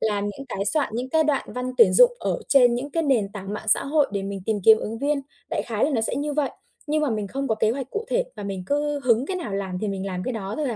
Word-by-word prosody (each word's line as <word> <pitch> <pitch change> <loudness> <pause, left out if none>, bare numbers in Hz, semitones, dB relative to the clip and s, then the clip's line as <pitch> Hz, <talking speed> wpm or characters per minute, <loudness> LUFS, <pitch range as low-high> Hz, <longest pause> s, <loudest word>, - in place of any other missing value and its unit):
làm 205 -2 0
những 275 +7 -8
cái 195 -4 -3
soạn 290 +7 +1
những 245 +3 -3
cái 315 +3 +3
đoạn 290 -2 +1
văn 250 0 -3
tuyển 460 - +7
dụng - - +7
ở - - -1
trên 250 -4 +6
những 270 +4 -4
cái 330 - 0
nền 245 -9 +2
tảng 195 -1 -6
mạng 210 - -7
xã - - +4
hội 290 0 +2
để 200 - -2
mình 195 0 -5
tìm 215 -2 0
kiếm 220 0 +8
ứng 225 +1 -5
viên. 285 +2 0 0.3
Đại - - -1
khái 220 -3 0
là 305 - +1
nó 230 - +2
sẽ 225 - -1
như 295 +1 -2
vậy, 290 -2 0 0.4
nhưng 305 +1 +1
mà 295 - +1
mình 215 -2 -2
không 275 +3 -3
có 220 - +2
kế 215 0 +1
hoạch 260 +2 -3
cụ 430 - -3
thể - - +1
và 210 - -6
mình 195 -2 -4
cứ 290 +2 0
hứng 240 +1 +3
cái 375 - -2
nào 330 - -5
làm 190 -2 -3
thì 215 - -1
mình 195 0 -3
làm 185 -1 -3
cái 255 - -3
đó 205 -3 -4
thôi 300 -3 -1
à. 230 - -3
245 Hz, 305 wpm, -24 LUFS, 205-290 Hz, 0.4 s, kiếm